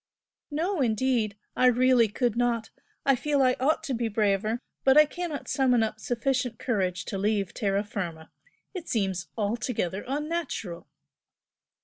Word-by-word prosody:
"No 325 Hz, +3 st, -1 dB
indeed! 225 Hz, -3 st, +1 dB, 0.2 s
I 255 Hz, -, +4 dB
really 250 Hz, -1 st, +5 dB
could 235 Hz, +2 st, 0 dB
not! 235 Hz, -2 st, 0 dB, 0.3 s
I 275 Hz, -, +5 dB
feel 285 Hz, +1 st, +1 dB
I 255 Hz, -1 st, +4 dB
ought 310 Hz, +5 st, +2 dB
to 285 Hz, -4 st, -2 dB
be 235 Hz, -1 st, 0 dB
braver 215 Hz, +1 st, +1 dB, 0.2 s
but 265 Hz, +1 st, +5 dB
I 305 Hz, -, +9 dB
cannot 325 Hz, -1 st, -5 dB
summon 250 Hz, -4 st, +3 dB
up 215 Hz, 0 st, -3 dB
sufficient 250 Hz, +1 st, -1 dB
courage 185 Hz, -7 st, -1 dB
to 195 Hz, -, -4 dB
leave 205 Hz, -2 st, 0 dB
terra 200 Hz, -2 st, 0 dB
firma. 170 Hz, -6 st, -5 dB, 0.4 s
It 365 Hz, -4 st, -7 dB
seems 190 Hz, -5 st, -1 dB
altogether 210 Hz, -3 st, -1 dB
unnatural." 290 Hz, -, -3 dB
235 Hz, 140 wpm, -27 LUFS, 205-270 Hz, 0.4 s, I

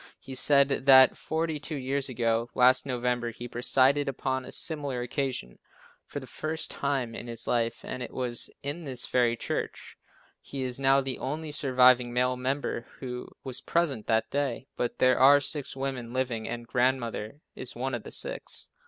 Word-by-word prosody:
He 135 Hz, -, -9 dB
said 140 Hz, 0 st, +3 dB
that 130 Hz, -1 st, +8 dB
forty 160 Hz, -1 st, -2 dB
two 150 Hz, +2 st, -5 dB
years 135 Hz, 0 st, -2 dB
ago 115 Hz, -1 st, 0 dB
last 130 Hz, +2 st, +5 dB
November, 125 Hz, -2 st, -1 dB
he 120 Hz, +1 st, -8 dB
presided 135 Hz, +4 st, +2 dB
upon 130 Hz, 0 st, -2 dB
a -, -, -9 dB
similar 145 Hz, -6 st, 0 dB
occasion 125 Hz, -, -3 dB, 0.5 s
for -, -, -5 dB
the -, -, -10 dB
first 160 Hz, +1 st, -3 dB
time 135 Hz, -5 st, -2 dB
in 120 Hz, -, -7 dB
his 115 Hz, -1 st, -2 dB
life 115 Hz, -1 st, -1 dB
and 130 Hz, -, -5 dB
it -, -, -5 dB
was 125 Hz, -2 st, +1 dB
in 145 Hz, +5 st, -4 dB
this 130 Hz, -4 st, -2 dB
very 120 Hz, -2 st, +2 dB
church. -, -, -4 dB, 0.5 s
He 135 Hz, -1 st, -5 dB
is 125 Hz, 0 st, -1 dB
now 135 Hz, 0 st, +4 dB
the 135 Hz, -1 st, -3 dB
only 150 Hz, +3 st, -4 dB
surviving 125 Hz, -3 st, +4 dB
male 125 Hz, +1 st, +1 dB
member 130 Hz, -2 st, -3 dB
who 125 Hz, -2 st, -6 dB
was 130 Hz, -2 st, 0 dB
present 145 Hz, -10 st, 0 dB
that 110 Hz, 0 st, +2 dB
day, 140 Hz, -3 st, -1 dB
but 120 Hz, -, -2 dB
there 130 Hz, -1 st, +4 dB
are 140 Hz, +2 st, +7 dB
six 140 Hz, -1 st, -3 dB
women 130 Hz, -3 st, -4 dB
living, 125 Hz, -4 st, -2 dB
and 120 Hz, 0 st, -5 dB
Grandmother 120 Hz, 0 st, -1 dB
is -, -, -1 dB
one -, -, -3 dB
of -, -, -2 dB
the -, -, -10 dB
six. -, -, -2 dB
130 Hz, 175 wpm, -28 LUFS, 120-140 Hz, 0.5 s, that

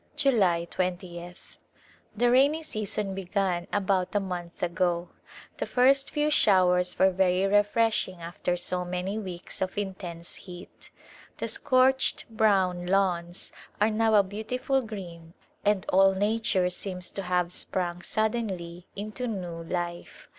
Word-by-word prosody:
July 205 Hz, -, +2 dB
20th, 175 Hz, -1 st, -5 dB, 0.6 s
The 240 Hz, +2 st, +3 dB
rainy 285 Hz, +5 st, +4 dB
season 210 Hz, -7 st, -3 dB
began 190 Hz, -2 st, -1 dB
about 195 Hz, -1 st, 0 dB
a -, -, +4 dB
month 180 Hz, -3 st, -6 dB
ago. 175 Hz, 0 st, 0 dB, 0.5 s
The -, -, -3 dB
first 270 Hz, +2 st, +4 dB
few 300 Hz, 0 st, 0 dB
showers 180 Hz, -6 st, +4 dB
were 190 Hz, 0 st, +5 dB
very 185 Hz, 0 st, +2 dB
refreshing 205 Hz, -2 st, +2 dB
after 175 Hz, +1 st, -2 dB
so 180 Hz, +1 st, -1 dB
many 180 Hz, +4 st, -3 dB
weeks 185 Hz, -4 st, -6 dB
of 190 Hz, +1 st, -2 dB
intense 185 Hz, -4 st, -5 dB
heat. 180 Hz, 0 st, -12 dB, 0.5 s
The -, -, -3 dB
scorched 260 Hz, +1 st, +2 dB
brown 190 Hz, -5 st, +2 dB
lawns 180 Hz, -2 st, 0 dB, 0.3 s
are 215 Hz, +2 st, +3 dB
now 220 Hz, 0 st, +3 dB
a 205 Hz, -, +6 dB
beautiful 220 Hz, +7 st, -1 dB
green 175 Hz, -7 st, -9 dB, 0.3 s
and 205 Hz, -3 st, +2 dB
all 195 Hz, +1 st, +5 dB
nature 205 Hz, -2 st, +1 dB
seems 180 Hz, -1 st, -5 dB
to 195 Hz, -, -5 dB
have 180 Hz, -1 st, 0 dB
sprung 175 Hz, -2 st, -3 dB
suddenly 190 Hz, -6 st, -2 dB
into 215 Hz, +5 st, -4 dB
new 180 Hz, -6 st, -4 dB
life. 175 Hz, 0 st, -5 dB
190 Hz, 130 wpm, -27 LUFS, 180-215 Hz, 0.6 s, a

